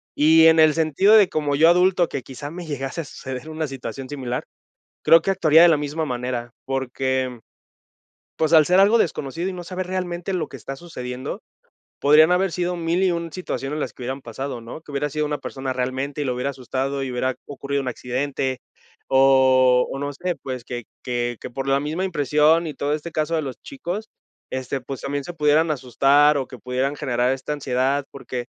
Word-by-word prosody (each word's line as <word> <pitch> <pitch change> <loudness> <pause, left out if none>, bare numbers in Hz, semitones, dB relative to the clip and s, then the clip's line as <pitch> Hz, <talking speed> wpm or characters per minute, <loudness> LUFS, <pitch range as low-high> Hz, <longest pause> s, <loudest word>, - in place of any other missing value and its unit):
Y 160 +2 +6
en 160 0 +6
el 155 -1 +6
sentido 160 +6 +3
de 205 -4 +6
como 145 -2 -1
yo 160 +3 +6
adulto, 180 0 +4
que 135 - -4
quizá 140 +2 -8
me 175 +1 -7
llegase 140 +1 -4
a - - -9
suceder 130 +2 -7
una 155 0 -3
situación 135 0 -7
similar, 130 -4 -4 0.6
creo 165 0 +7
que 195 - 0
actuaría 165 -4 +5
de 175 - +8
la 165 - +5
misma 150 +2 -2
manera 125 -2 -3 0.2
porque, 130 -1 -2 1.0
pues, 160 0 0
al 155 -2 +7
ser 180 +2 +5
algo 210 +4 +5
desconocido 165 - -1
y - - -3
no 180 - -6
saber 185 +1 -4
realmente 180 0 -3
lo 175 - -2
que - - -9
está 135 - -7
sucediendo, 130 -6 -6 0.6
podrían 155 +3 +6
haber 185 0 +2
sido 180 +1 -1
1001 170 0 0
situaciones 150 -6 -4
en - - -3
las - - -3
que - - -12
hubieran 130 +2 -4
pasado, 125 +2 -5
¿no? 115 +7 -9
Que 150 - -12
hubiera 145 +1 -1
sido 150 +1 -1
una 150 0 -2
persona 135 -1 -4
realmente 130 +3 -3
y - - -1
lo 130 - 0
hubiera 125 +3 -2
asustado 135 +1 -3
y 135 - -3
hubiera 130 +1 -1
ocurrido 140 0 -3
un 130 - -3
accidente 130 +1 -2 0.5
o 130 -1 +5
o - - -4
no 145 +1 -3
sé, 175 +5 -3
pues, 130 -2 -5
que 120 -2 -6 0.2
que 120 -1 -2
que - - -7
por 135 +2 -5
la 135 0 +3
misma 155 +6 -2
impresión 155 -1 +3
y 150 - -6
todo 145 +2 -2
este 155 +3 -5
caso 155 +1 -1
de 160 - 0
los 135 -3 -5
chicos, 220 -6 -5 0.4
este, 130 +1 -3
pues, 130 +1 -7
también 140 0 -3
se 175 - -7
pudieran 155 +1 +3
asustar 140 +2 +3
o 135 - -2
que - - -9
pudieran 130 +4 -2
generar 125 -3 0
esta 135 +2 -4
ansiedad 135 0 0
porque, 125 -3 -6
145 Hz, 200 wpm, -22 LUFS, 130-165 Hz, 1.0 s, de